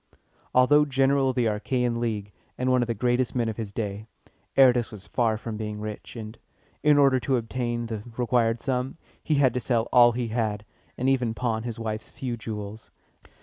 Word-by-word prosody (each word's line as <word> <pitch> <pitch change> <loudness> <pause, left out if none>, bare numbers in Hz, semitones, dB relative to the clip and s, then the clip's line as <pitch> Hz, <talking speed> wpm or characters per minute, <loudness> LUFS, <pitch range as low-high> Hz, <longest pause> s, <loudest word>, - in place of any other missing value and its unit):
Although 145 +4 +6
general 135 -1 +2
of 130 - -2
the 125 -2 +2
Achæan 120 +3 0
League, 110 -4 -2 0.3
and 130 0 +1
one 125 -1 +4
of 120 - 0
the 115 - -1
greatest 120 +3 0
men 120 -2 +1
of 110 - -5
his 110 -3 -5
day, 105 0 -4 0.5
Aratus 125 -3 +5
was 105 -3 -8
far 115 -3 +1
from 110 0 -6
being 105 -1 -4
rich; 105 +2 -7
and, 110 0 -8 0.4
in 150 -1 +5
order 135 -2 +5
to 130 +1 +1
obtain 120 0 -2
the 110 -2 -4 0.2
required 120 -2 +1
sum, 130 +1 -2 0.2
he 155 - 0
had 135 -4 +4
to 125 - 0
sell 115 -1 0
all 120 -1 +7
he 120 -1 -2
had, 110 -2 -2 0.3
and 130 - -1
even 125 -4 +1
pawn 115 -3 -1
his 115 -1 -5
wife's 110 -1 -4
few 125 -3 -4
jewels. 110 -1 -7
120 Hz, 190 wpm, -26 LUFS, 110-125 Hz, 0.5 s, all